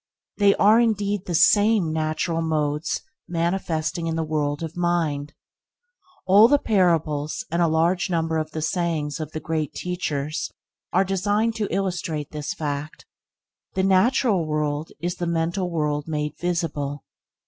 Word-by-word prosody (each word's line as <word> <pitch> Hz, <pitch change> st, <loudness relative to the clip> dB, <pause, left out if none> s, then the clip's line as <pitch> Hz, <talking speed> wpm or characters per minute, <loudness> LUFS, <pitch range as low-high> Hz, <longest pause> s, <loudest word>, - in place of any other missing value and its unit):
They 200 Hz, -1 st, +5 dB
are 215 Hz, +3 st, +5 dB
indeed 205 Hz, -4 st, 0 dB
the 175 Hz, -, -1 dB
same 205 Hz, 0 st, +4 dB
natural 160 Hz, +1 st, -1 dB
modes 150 Hz, -1 st, -1 dB, 0.2 s
manifesting 170 Hz, -2 st, -1 dB
in 165 Hz, -, -1 dB
the 165 Hz, -, 0 dB
world 150 Hz, -1 st, -1 dB
of 160 Hz, -1 st, -6 dB
mind. 165 Hz, -5 st, -1 dB, 0.9 s
All 200 Hz, +4 st, +7 dB
the 290 Hz, +3 st, +5 dB
parables 165 Hz, -, +1 dB
and 170 Hz, +1 st, +1 dB
a 170 Hz, -, +4 dB
large 165 Hz, +4 st, +1 dB
number 165 Hz, -2 st, 0 dB
of 155 Hz, 0 st, -3 dB
the 155 Hz, -1 st, -4 dB
sayings 160 Hz, -4 st, -1 dB
of 155 Hz, -1 st, -5 dB
the 155 Hz, -, -3 dB
Great 155 Hz, -3 st, -2 dB
Teachers 155 Hz, -4 st, -3 dB, 0.4 s
are 190 Hz, -, +3 dB
designed 205 Hz, +4 st, +1 dB
to 210 Hz, -2 st, -2 dB
illustrate 175 Hz, -6 st, -2 dB
this 150 Hz, -1 st, -4 dB
fact. 145 Hz, 0 st, -4 dB, 0.7 s
The 190 Hz, -, +1 dB
natural 195 Hz, -, +3 dB
world 150 Hz, 0 st, -2 dB
is 175 Hz, +1 st, -2 dB
the 175 Hz, -, -2 dB
mental 170 Hz, +2 st, -1 dB
world 150 Hz, -3 st, -1 dB
made 150 Hz, -1 st, -2 dB
visible. 150 Hz, -5 st, -2 dB
165 Hz, 145 wpm, -24 LUFS, 155-185 Hz, 0.9 s, All